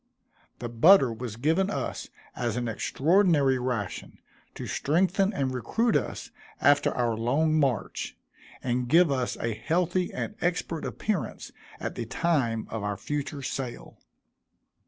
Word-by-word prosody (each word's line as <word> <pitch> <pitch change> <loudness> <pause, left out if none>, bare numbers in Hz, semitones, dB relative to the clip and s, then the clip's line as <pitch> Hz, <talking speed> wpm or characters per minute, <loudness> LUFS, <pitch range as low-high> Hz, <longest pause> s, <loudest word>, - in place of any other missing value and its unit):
The 120 - -5
butter 125 +3 +6
was 115 -1 -6
given 160 - +1
us - - -4 0.3
as 120 -2 -2
an 120 -1 -1
extraordinary 145 - +2
ration, 120 -6 -3 0.4
to - - -6
strengthen 190 +6 +1
and 135 -8 -1
recruit 215 - 0
us - - -2 0.3
after 145 +1 +4
our 120 -2 +1
long 150 +8 +2
march, 135 -7 -1 0.5
and 125 0 0
give 165 +3 +5
us 130 -3 -1
a 115 -1 -2
healthy 175 - 0
and - - -4
expert 170 -2 -1
appearance 205 -7 -3 0.3
at - - -4
the 115 - -5
time 125 -7 0
of 110 - -3
our 105 -1 -2
future 145 +5 -4
sale. 130 -2 -5
135 Hz, 135 wpm, -27 LUFS, 120-170 Hz, 0.5 s, butter